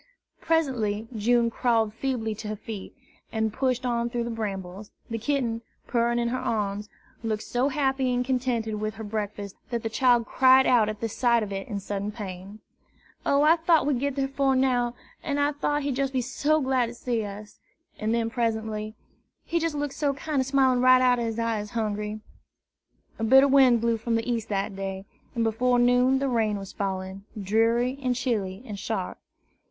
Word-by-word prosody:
Presently 240 -10 0
June 235 +2 +2
crawled 225 -3 +1
feebly 230 -2 -2
to 215 +1 -7
her 215 - -3
feet, 210 -1 -8 0.4
and 220 -1 -1
pushed 255 0 0
on 235 -1 0
through 240 0 -2
the 235 - -4
brambles. 200 -2 -5 0.2
The 225 - -2
kitten, 235 -2 -1 0.2
purring 235 0 +1
in 235 0 +1
her 255 +2 -1
arms, 205 -1 -2 0.3
looked 220 -2 -2
so 250 +3 0
happy 270 -2 0
and 245 0 0
contented 240 -4 -1
with 215 0 -2
her 220 - -7
breakfast 205 -2 -4
that 235 -2 -2
the 225 - -3
child 245 -1 +3
cried 260 +3 +5
out 230 -4 +4
at 215 -1 -6
the 230 - 0
sight 235 +1 +2
of 205 - -6
it 195 0 -4
in 205 -3 -3
sudden 200 +1 -3
pain. 200 -1 -8 0.7
"O, 280 +1 +4
I 320 +3 +6
tought 325 -2 +3
we'd 280 -4 +1
git 280 0 -1
dar 275 -1 0
'fore 275 0 +1
now, 250 -2 +1 0.3
an' 285 -1 -2
I 285 0 +2
tought 295 0 -1
he'd 275 -2 -2
jes' 275 -1 +1
be 260 -1 -1
so 295 +5 +1
glad 260 -2 +1
to 235 - -8
see 235 -2 -2
us!" 205 +1 -9 0.4
and 215 +1 -1
then 230 -1 0
presently, 220 -2 -2 0.5
"He 340 - 0
jes' 330 -2 -1
look 290 -1 -2
so 280 -1 -1
kinder 285 -1 -1
smilin' 260 -2 +3
right 255 0 +7
out 250 -1 +3
ob 235 - -1
his 225 -1 -3
eyes, 225 -3 -1
Hungry!" 210 -1 -3 1.0
A - - -2
bitter 265 +5 +7
wind 260 -4 +5
blew 230 0 +1
from 230 +1 -1
the 225 +1 -1
east 230 -2 -2
that 200 0 -2
day, 195 0 -5 0.3
and 230 - +1
before 245 +3 +2
noon 245 +2 +4
the 275 +1 0
rain 220 -4 +1
was 195 -1 -8
falling, 190 0 -4
dreary 230 +6 +1
and 255 -2 0
chilly 210 -5 -2
and 210 -5 -6
sharp. - - -3
235 Hz, 190 wpm, -26 LUFS, 215-260 Hz, 1.0 s, right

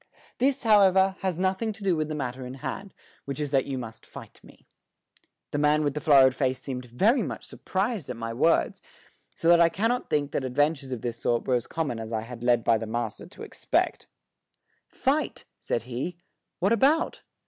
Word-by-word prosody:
This, 270 +2 +1
however, 195 -3 +5
has 185 -3 -2
nothing 190 +4 0
to 205 - -12
do 190 -3 +2
with 155 -1 -1
the 155 - -4
matter 130 -2 -4
in 125 +1 -7
hand, 150 +9 -6 0.3
which 140 0 -5
is 145 -2 -3
that 135 -2 +2
you 135 -1 -3
must 115 -3 -8
fight - - -12
me." - - -18 0.9
The 145 - -1
man 150 +1 +3
with 145 -2 0
the 150 - -4
florid 135 -4 +6
face 130 -1 -1
seemed 130 -2 -6
very 205 - +2
much 135 - -5
surprised 195 - -3
at 125 - -3
my 115 0 -4
words, 160 +8 +2 0.5
so 165 - -2
that 170 0 +7
I 170 -1 +6
cannot 225 +8 -1
think 145 -1 0
that - - -2
adventures 140 +2 0
of 125 -3 -4
this 120 -1 -4
sort 120 -1 0
were 130 - +2
as 120 -1 0
common 145 -8 -3
as 110 0 -6
I 110 -1 -1
had 115 +1 -9
been 120 - -4
led 120 -2 +4
by 115 -1 +3
the 115 - -5
master 115 -1 -4
to - - -12
expect. - - -1 0.8
"Fight!" - - -1
said 115 - -2
he. 130 +9 -5 0.4
"What 195 +5 +2
about?" 280 +8 +2
145 Hz, 205 wpm, -26 LUFS, 125-185 Hz, 0.9 s, that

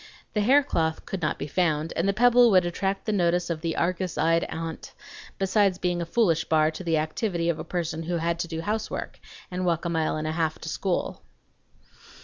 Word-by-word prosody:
The 210 - +1
haircloth 205 - +2
could 195 - -5
not 155 - 0
be - - -4
found, 160 0 0
and 170 - 0
the - - +5
pebble 245 +3 +5
would 185 -4 +4
attract 195 +3 -2
the 215 - 0
notice 175 -3 +1
of 160 -2 -3
the 165 -1 -2
Argus 180 0 -1
eyed 165 +1 +2
aunt, 165 0 -6 0.4
besides 195 -1 +2
being 175 -1 -1
a 170 - -4
foolish 170 -5 +2
bar 155 -1 +3
to 160 - -8
the 165 -2 +1
activity 170 +2 -1
of 165 -2 -1
a - - -4
person 165 -1 -3
who 170 +1 -2
had 170 +1 -1
to 170 - -2
do 165 -1 -4
housework 215 +4 -3 0.3
and 180 +1 -2
walk 170 -2 0
a - - 0
mile 160 -2 0
and 155 - -3
a 155 - -1
half 160 -1 -1
to 160 - -5
school. 185 +2 -2
170 Hz, 210 wpm, -26 LUFS, 160-190 Hz, 0.4 s, the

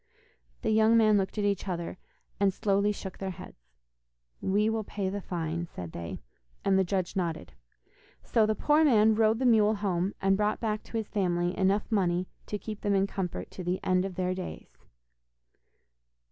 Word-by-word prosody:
The 220 - +1
young 220 +1 +5
men 215 -2 +5
looked 190 +2 -3
at 205 - +1
each 200 -1 0
other, 175 -1 -4 0.4
and 200 -1 +4
slowly 200 +2 +1
shook 190 -2 -7
their 195 - -3
heads. 60 - -11 0.7
'We 205 +3 +2
will 220 -1 -1
pay 195 -2 -3
the 200 +1 -4
fine,' 170 -1 -3
said 90 - -8
they, 85 -3 -7 0.4
and 195 - +4
the 190 - +4
judge 185 0 -2
nodded. 165 - -3 0.7
So 220 -2 +2
the 215 - +1
poor 300 +7 +3
man 220 -6 +5
rode 220 0 +3
the 260 - -1
mule 220 -3 +5
home, 195 -2 -1
and 195 0 +3
brought 210 +1 0
back 215 -2 -1
to 230 - -5
his 220 -2 -2
family 175 -3 0
enough 195 +2 +2
money 180 -3 +1 0.2
to 210 - -2
keep 210 0 -7
them 205 -1 +1
in 195 0 +3
comfort 190 -3 -4
to 185 - -7
the 180 +2 -1
end 185 0 +2
of 190 -2 -5
their 185 0 0
days. 185 -1 -7
195 Hz, 185 wpm, -29 LUFS, 180-215 Hz, 0.7 s, young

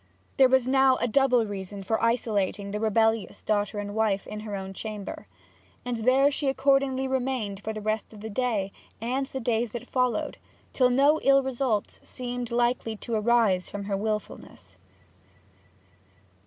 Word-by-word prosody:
There 265 -2 +6
was 260 -1 +3
now 265 0 +5
a 245 - -1
double 250 -1 +3
reason 200 -1 -6
for 220 +3 -1
isolating 210 -4 0
the 210 - -3
rebellious 220 0 +1
daughter 205 0 0
and 205 0 -4
wife 210 -2 +1
in 210 - -6
her 210 -1 -5
own 190 0 -6
chamber, 210 -1 -7 0.6
and 245 -1 -2
there 260 +5 +4
she 285 0 -2
accordingly 270 0 +2
remained 255 -6 -2
for 220 - -3
the 215 -1 -6
rest 215 0 -2
of 215 -2 -12
the 220 - -6
day 210 -4 -1 0.3
and 255 +4 -1
the 265 - -5
days 235 -1 0
that 240 - -5
followed; 250 -4 -1 0.3
till 255 -2 +4
no 280 +5 +4
ill 275 0 +5
results 250 -5 -2
seemed 245 -1 -5
likely 240 -1 0
to 230 +2 -6
arise 215 -4 +2
from 205 0 -5
her 200 0 -2
wilfulness. 200 - -5
225 Hz, 160 wpm, -27 LUFS, 210-255 Hz, 0.6 s, There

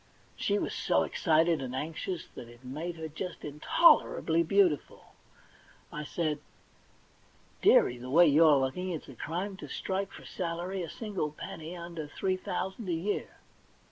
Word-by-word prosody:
She 205 - 0
was - - -2
so - - +2
excited 165 -2 +2
and 130 -1 -4
anxious 165 +5 -4
that 120 - -9
it 120 +2 -16
made 160 +7 -4
her 160 -1 -5
just 170 +4 -6
intolerably 160 - +4
beautiful. 175 -2 +1 0.8
I 150 0 -4
said: 155 -1 -1 0.6
* - - -32
Dearie, 120 0 +5
the 125 +1 -7
way 170 +6 +7
you're 155 -1 +6
looking 135 +8 -1
it's 165 -4 -5
a - - -9
crime 180 - -4
to - - -8
strike 190 0 -3
for - - -12
a - - -14
salary 180 +2 -3
a 170 - -5
single 200 -8 -3
penny 160 +3 -7
under 170 -3 -6
three 185 +5 -1
thousand 190 +2 -4
a - - +1
year.' 175 +6 -2
165 Hz, 160 wpm, -30 LUFS, 150-185 Hz, 0.8 s, way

